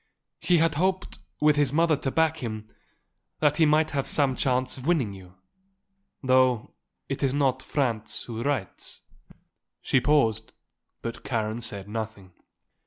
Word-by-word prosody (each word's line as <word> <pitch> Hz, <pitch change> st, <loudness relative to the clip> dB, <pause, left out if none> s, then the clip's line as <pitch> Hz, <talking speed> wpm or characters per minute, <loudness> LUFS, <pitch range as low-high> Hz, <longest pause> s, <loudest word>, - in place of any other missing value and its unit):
He 180 Hz, -, +3 dB
had 165 Hz, -1 st, +3 dB
hoped, 190 Hz, 0 st, -1 dB, 0.2 s
with 150 Hz, -1 st, +4 dB
his 145 Hz, -3 st, +3 dB
mother 165 Hz, +1 st, +3 dB
to 135 Hz, -, -2 dB
back 160 Hz, +2 st, +2 dB
him, 110 Hz, -3 st, -5 dB, 0.7 s
that 150 Hz, -1 st, +3 dB
he 160 Hz, -2 st, +5 dB
might 155 Hz, +1 st, +3 dB
have 140 Hz, -2 st, -1 dB
some 140 Hz, -3 st, +1 dB
chance 130 Hz, 0 st, 0 dB
of 130 Hz, +2 st, -8 dB
winning 140 Hz, -13 st, +1 dB
you; 90 Hz, -2 st, -13 dB, 0.9 s
though 130 Hz, -3 st, +3 dB, 0.3 s
it -, -, -4 dB
is 135 Hz, -1 st, +1 dB
not 135 Hz, -2 st, +1 dB
Franz 115 Hz, -8 st, -2 dB
who 115 Hz, -1 st, -6 dB
writes." 125 Hz, -8 st, -3 dB, 0.8 s
She 130 Hz, -, +2 dB
paused; 130 Hz, -6 st, +2 dB, 0.5 s
but 115 Hz, +1 st, -5 dB
Karen 110 Hz, -1 st, -2 dB
said 100 Hz, -4 st, -6 dB
nothing. 110 Hz, -3 st, -6 dB
130 Hz, 145 wpm, -26 LUFS, 110-150 Hz, 0.9 s, he